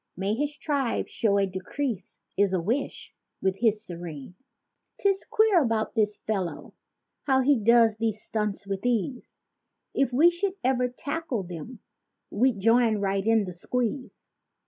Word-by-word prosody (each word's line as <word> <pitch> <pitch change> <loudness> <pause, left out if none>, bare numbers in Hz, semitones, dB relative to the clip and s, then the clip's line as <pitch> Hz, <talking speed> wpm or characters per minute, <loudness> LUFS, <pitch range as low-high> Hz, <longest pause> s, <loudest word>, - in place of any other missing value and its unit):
May 195 +3 0
his 290 +5 -2
tribe 280 -5 -1
show 200 -3 +1
a 200 - +3
decrease 190 +3 -4
is 200 -1 +2
a - - +1
wish, 235 +11 -3 0.3
with 190 +1 -1
us 215 -2 +3
serene. 170 -4 -8 0.7
'Tis 395 -1 +1
queer 430 -5 +4
about 225 -5 0
this 210 -2 +1
fellow—how 220 - -3
he 275 -1 +3
does 225 0 +5
these 220 -1 -1
stunts 210 -3 -3
with 195 -1 -4
ease— 245 +1 -2 0.6
If 275 -2 +1
we 310 +8 +5
should 370 +2 -2
ever 250 -1 +2
tackle 280 -2 -4
them 180 +7 -8 0.5
we'd 240 0 +2
join 230 +1 +4
right 195 -1 0
in 225 -1 +3
the 180 - -6
squeeze. 250 +8 -3
225 Hz, 145 wpm, -27 LUFS, 200-265 Hz, 0.7 s, does